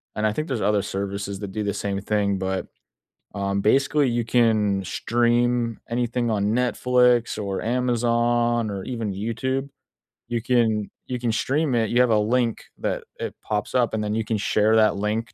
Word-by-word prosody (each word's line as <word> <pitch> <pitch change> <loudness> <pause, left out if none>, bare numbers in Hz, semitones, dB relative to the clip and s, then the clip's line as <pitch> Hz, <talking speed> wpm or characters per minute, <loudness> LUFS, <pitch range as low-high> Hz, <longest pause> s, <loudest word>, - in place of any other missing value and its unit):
and, 110 0 +1
I - - +1
think 155 +7 -3
there's 130 -6 -2
other 105 -1 +2
services 100 0 -4
that 100 -2 -6
do 105 +2 -3
the 100 -1 -1
same 100 -1 -2
thing, 100 -1 0
but, 95 0 -2 0.7
um, 100 0 -1
basically, 140 +5 +3
you 120 -1 -1
can 110 -4 +2
stream 120 +3 +1
anything 120 0 -1
on 100 -2 0
Netflix, 125 +1 +2
or 100 -2 -3
Amazon, 120 -1 +1
or 100 -2 -4
even 115 -5 -3
YouTube. 130 +7 -2 0.6
You 120 -1 -2
can 110 -4 +1 0.2
you 125 -1 -3
can 120 -1 0
stream 135 +6 0
it. 115 -2 +1
You 120 - +4
have 125 - +3
a 110 - +4
link 115 +2 0 0.2
that - - -2 0.2
it - - -4
pops 105 -1 -2
up 120 -3 +2
and 105 - -1
then 105 0 -2
you 110 +1 0
can 110 0 -1
share 105 +1 +2
that 110 -2 +4
link 105 +3 -2
115 Hz, 180 wpm, -24 LUFS, 105-120 Hz, 0.7 s, You